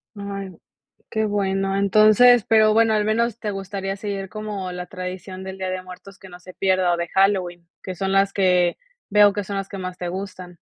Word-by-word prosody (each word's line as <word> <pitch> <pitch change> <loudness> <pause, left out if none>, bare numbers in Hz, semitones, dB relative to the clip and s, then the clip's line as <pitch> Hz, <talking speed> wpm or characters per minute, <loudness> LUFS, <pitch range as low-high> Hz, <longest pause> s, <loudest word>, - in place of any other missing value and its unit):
Ay, 200 -1 -6 0.6
qué 220 -1 -1
bueno. 195 -2 -1
Entonces, 215 +4 +5
pero 215 -1 +5
bueno, 225 0 +3
al 210 -1 +1
menos 230 +1 0
te 210 -2 -3
gustaría 195 0 -4
seguir 195 -1 -5
como 210 -3 -5
la 180 0 -6
tradición 185 0 -7
del 190 0 -7
Día 190 -1 -3
de 185 0 -3
Muertos 185 +2 -13
que 190 - -13
no 175 0 -12
se 185 +1 -13
pierda 185 -2 +1
o - - -1
de 170 0 -3
Halloween, 185 -3 +1 0.2
que 185 - -6
son 195 +2 -2
las 195 0 +2
que 180 -3 +2 0.3
veo 205 0 +5
que 205 0 -3
son 200 +1 -6
las 195 0 -4
que 195 - -7
más 185 -1 -6
te 180 - -5
gustan. 185 -1 -7
195 Hz, 205 wpm, -22 LUFS, 185-205 Hz, 0.6 s, Entonces